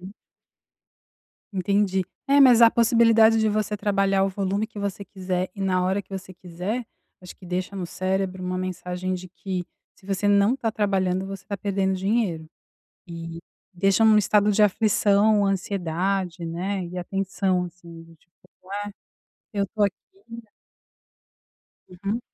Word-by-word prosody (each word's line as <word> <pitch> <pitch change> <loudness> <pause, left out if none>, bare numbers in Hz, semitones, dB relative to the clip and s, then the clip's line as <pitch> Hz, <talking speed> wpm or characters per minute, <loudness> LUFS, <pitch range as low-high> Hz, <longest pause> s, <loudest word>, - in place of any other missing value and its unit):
Hum. 190 +3 -10 1.4
Entendi, 195 0 +1 0.2
é 280 +1 +5
mas 250 -3 +7
há 230 - +10
a - - +5
possibilidade 230 -1 +5
de 220 0 +2
você 210 0 -1
trabalhar 195 -1 +1
o - - +1
volume 200 +2 -1
que 210 - -12
você 200 0 -4
quiser, 185 -2 -3
e 200 - -9
na 185 -1 +1
hora 195 +2 0
que 190 - -39
você 190 -1 -7
quiser, 185 +8 -4 0.4
acho 180 - -10
que 185 - -14
deixa 185 +2 -3
no 180 -2 -3
cérebro 185 0 -2
uma 180 0 -2
mensagem 185 0 -3
de 185 0 -7
que 185 0 -5 0.3
se 190 - -25
você 195 +1 -1
não 205 +5 +4
tá 225 -4 -1
trabalhando 190 -3 0
você 195 -1 -8
tá 200 - -4
perdendo 195 -1 -1
dinheiro, 190 -4 -1 0.6
e 165 -1 -7 0.3
deixa 195 +4 +2
num 215 -1 +6
estado 210 0 +3
de 210 - +3
aflição, 210 0 +3
ansiedade, 185 -2 -1
né, 185 +3 -3
e 180 +1 -8
atenção, 185 0 -1
assim, 170 -1 -11
do 165 0 -17
tipo: 170 +2 -32 1.2
"Ué 200 - +1
eu - - +1
tô 210 0 -1
aqui!". 200 -1 +2 2.0
Uhum. 200 +6 -4
195 Hz, 155 wpm, -24 LUFS, 180-205 Hz, 2.0 s, há